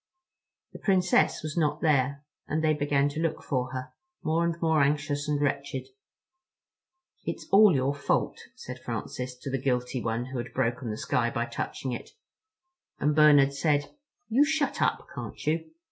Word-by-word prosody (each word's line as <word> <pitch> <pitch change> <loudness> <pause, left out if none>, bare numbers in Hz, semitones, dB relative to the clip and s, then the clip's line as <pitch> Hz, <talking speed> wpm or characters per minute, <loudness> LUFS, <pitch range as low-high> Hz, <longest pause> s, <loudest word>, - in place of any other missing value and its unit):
The - - -9
Princess 185 -5 +2
was 155 -1 -4
not 150 -2 +1
there, 140 -2 +1 0.2
and 155 +1 -1
they 155 -1 +4
began 145 -1 +1
to 145 - -5
look 165 -1 -1
for 130 -3 -1
her, 130 0 -6 0.3
more 160 +2 +1
and 170 0 -1
more 160 -2 +3
anxious 145 0 0
and 145 -1 +1
wretched. 140 - -2 1.3
"It's - - -4
all 200 -3 +7
your 135 +1 +1
fault," 145 - 0 0.2
said - - -8
Francis 125 0 -5
to 130 +2 -7
the 135 -2 -1
guilty 125 -1 -1
one 115 +1 -1
who 130 - -3
had 120 - -7
broken 125 -1 -1
the 105 - -3
sky - - 0
by - - -1
touching 130 - -4
it; 120 - -6 0.9
and 150 +1 +1
Bernard 145 -3 +6
said, 145 0 +1 0.4
"You 245 +6 +4
shut 310 -1 0
up, - - +1
can't - - -6
you?" 160 +1 0
145 Hz, 165 wpm, -28 LUFS, 130-160 Hz, 1.3 s, all